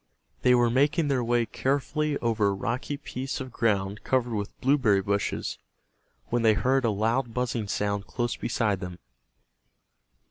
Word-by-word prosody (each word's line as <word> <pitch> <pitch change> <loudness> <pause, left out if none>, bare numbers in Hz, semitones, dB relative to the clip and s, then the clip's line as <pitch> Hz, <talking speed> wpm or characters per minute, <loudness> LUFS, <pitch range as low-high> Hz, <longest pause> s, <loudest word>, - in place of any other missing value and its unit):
They 125 0 +5
were 120 -1 +3
making 145 +4 +2
their 130 -3 +1
way 120 0 +2
carefully 145 +5 -1
over 110 -3 +2
a 100 - +2
rocky 120 +8 -3
piece 135 -2 -5
of 130 -1 -6
ground 100 -3 0
covered 125 -2 +1
with 100 -2 -4
blueberry 125 -8 +3
bushes, 100 0 -1 0.7
when 120 0 +1
they 110 -1 +5
heard 130 +7 +2
a - - +3
loud 115 +3 0
buzzing 120 -4 -1
sound 100 0 -1
close 120 -1 -2
beside 110 -5 0
them. 90 -1 -6
120 Hz, 150 wpm, -27 LUFS, 105-130 Hz, 0.7 s, They